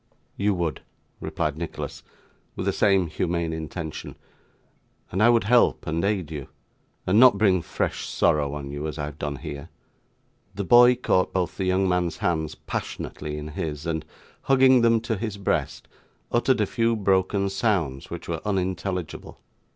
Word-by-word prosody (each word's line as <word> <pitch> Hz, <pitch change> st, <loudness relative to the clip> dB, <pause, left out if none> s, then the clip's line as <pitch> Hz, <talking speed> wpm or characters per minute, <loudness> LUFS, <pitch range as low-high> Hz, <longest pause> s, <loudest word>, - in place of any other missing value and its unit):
'You 100 Hz, 0 st, +1 dB
would,' 85 Hz, -3 st, -2 dB, 0.4 s
replied 75 Hz, 0 st, -2 dB
Nicholas, 85 Hz, -1 st, -5 dB, 0.5 s
with -, -, -4 dB
the -, -, +1 dB
same 95 Hz, -3 st, +3 dB
humane 85 Hz, +1 st, -2 dB
intention, 80 Hz, 0 st, -6 dB, 1.0 s
'and 95 Hz, -, -1 dB
I 115 Hz, -, +6 dB
would 120 Hz, -1 st, +4 dB
help 120 Hz, +4 st, +3 dB
and 80 Hz, +1 st, -1 dB
aid 95 Hz, -6 st, -1 dB
you, 75 Hz, -4 st, -6 dB, 0.6 s
and 95 Hz, +4 st, +4 dB
not 125 Hz, -4 st, +7 dB
bring 95 Hz, -4 st, +3 dB
fresh -, -, -3 dB
sorrow 75 Hz, -4 st, +1 dB
on 70 Hz, -1 st, -6 dB
you 75 Hz, +2 st, -4 dB
as 75 Hz, -, -5 dB
I 75 Hz, -, -2 dB
have 75 Hz, 0 st, -9 dB
done 70 Hz, 0 st, -3 dB
here.' 70 Hz, +1 st, -7 dB, 0.9 s
The 100 Hz, -, -2 dB
boy 120 Hz, +5 st, +7 dB
caught 95 Hz, -6 st, +1 dB
both 90 Hz, -2 st, -1 dB
the 95 Hz, -, -2 dB
young 95 Hz, +1 st, +2 dB
man's 90 Hz, -2 st, 0 dB
hands 80 Hz, -3 st, -1 dB
passionately 75 Hz, 0 st, -5 dB
in 75 Hz, 0 st, -6 dB
his, 75 Hz, -2 st, -4 dB
and, 80 Hz, -2 st, -2 dB, 0.4 s
hugging 130 Hz, -2 st, +5 dB
them 115 Hz, -1 st, +4 dB
to 115 Hz, -2 st, -2 dB
his 110 Hz, 0 st, -4 dB
breast, 100 Hz, -, -2 dB, 0.4 s
uttered -, -, +2 dB
a -, -, +3 dB
few 115 Hz, 0 st, +1 dB
broken 100 Hz, -1 st, +1 dB
sounds 95 Hz, -, -1 dB
which -, -, -7 dB
were -, -, -3 dB
unintelligible. 95 Hz, -3 st, -3 dB
90 Hz, 160 wpm, -25 LUFS, 80-105 Hz, 1.0 s, not